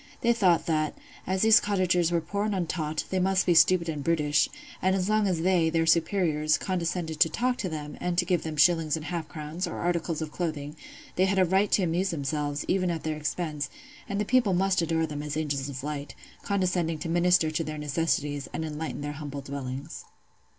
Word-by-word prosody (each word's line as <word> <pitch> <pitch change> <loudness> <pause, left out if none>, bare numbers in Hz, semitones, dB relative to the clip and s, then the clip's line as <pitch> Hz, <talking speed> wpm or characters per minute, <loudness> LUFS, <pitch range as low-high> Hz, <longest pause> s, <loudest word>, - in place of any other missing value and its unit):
They 235 0 +4
thought 185 -7 +3
that, 155 -2 0 0.3
as 190 +1 +1
these 220 +1 +7
cottagers 180 -4 +1
were 170 -1 +1
poor 200 +6 -2
and 210 -2 -1
untaught, 160 -4 -2
they 190 - +1
must 190 0 +2
be 175 - +4
stupid 170 +1 +5
and 150 -3 -3
brutish; 150 -2 +2 0.3
and 190 +1 +2
as 185 -1 0
long 215 -1 +3
as 170 -4 0
they, 175 -3 +3
their 165 0 +1
superiors, 160 -3 +2
condescended 170 -3 -2
to 165 - +5
talk 250 +9 0
to 185 - -3
them, 150 -2 -6
and 180 -1 -1
to 175 - +3
give 175 -2 +1
them 155 -1 -5
shillings 165 -1 +4
and 155 -1 -6
half 170 -2 -4
crowns, 155 +3 -4
or - - -5
articles 170 -2 -1
of 155 -2 -4
clothing, 150 -4 -4 0.4
they 185 - +4
had 195 0 0
a 185 - +5
right 190 +3 +2
to 195 - +4
amuse 180 +3 0
themselves, 145 -1 -2
even 185 -1 +1
at 165 -2 -3
their 155 -1 -2
expense; 150 0 -3 0.4
and 200 0 -2
the 210 - 0
people 235 -5 +3
must 190 0 +2
adore 165 -1 +1
them 150 -2 -5
as 150 0 -4
angels 140 -3 -2
of 130 -1 -6
light, 145 -1 -5 0.3
condescending 180 -4 0
to 165 - -5
minister 175 -1 +3
to 155 +1 -1
their 155 -1 -5
necessities, 145 -1 -1
and 160 - -3
enlighten 155 0 -5
their 145 0 -3
humble 145 -1 -6
dwellings. 140 +2 -6
165 Hz, 210 wpm, -27 LUFS, 150-185 Hz, 0.4 s, these